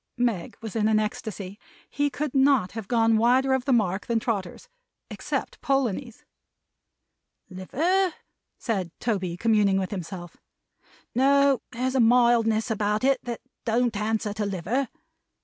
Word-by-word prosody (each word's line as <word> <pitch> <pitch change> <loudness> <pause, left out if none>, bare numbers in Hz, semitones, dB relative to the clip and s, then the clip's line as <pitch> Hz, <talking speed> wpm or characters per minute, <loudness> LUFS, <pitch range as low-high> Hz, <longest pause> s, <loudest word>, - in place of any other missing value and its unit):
Meg 235 -8 -1
was 220 -2 -7
in 215 -1 +2
ecstasy. 210 -2 -4 0.3
He 290 +1 0
could 290 0 -4
not 270 -8 +3
have 220 -2 -7
gone 225 -1 +3
wider 255 +4 +3
of 265 -1 0
the 275 - +1
mark 205 -5 +1
than 235 -1 +1
Trotters 215 - -4 0.4
except - - -4
Polonies. 260 -3 -1 1.3
"Liver?" 330 - 0 0.4
said 195 -7 -2
Toby, 190 -7 -2
communing 210 -2 +3
with 190 -1 -2
himself. 175 -2 -7 0.8
"No. 275 +1 +4
There's 255 +2 -2
a 265 - +1
mildness 230 -1 +3
about 210 0 0
it 275 0 +3
that 240 -1 -5 0.2
don't 235 0 +1
answer 215 0 -1
to 210 +1 -3
liver. 200 +8 -1
225 Hz, 130 wpm, -25 LUFS, 205-255 Hz, 1.3 s, No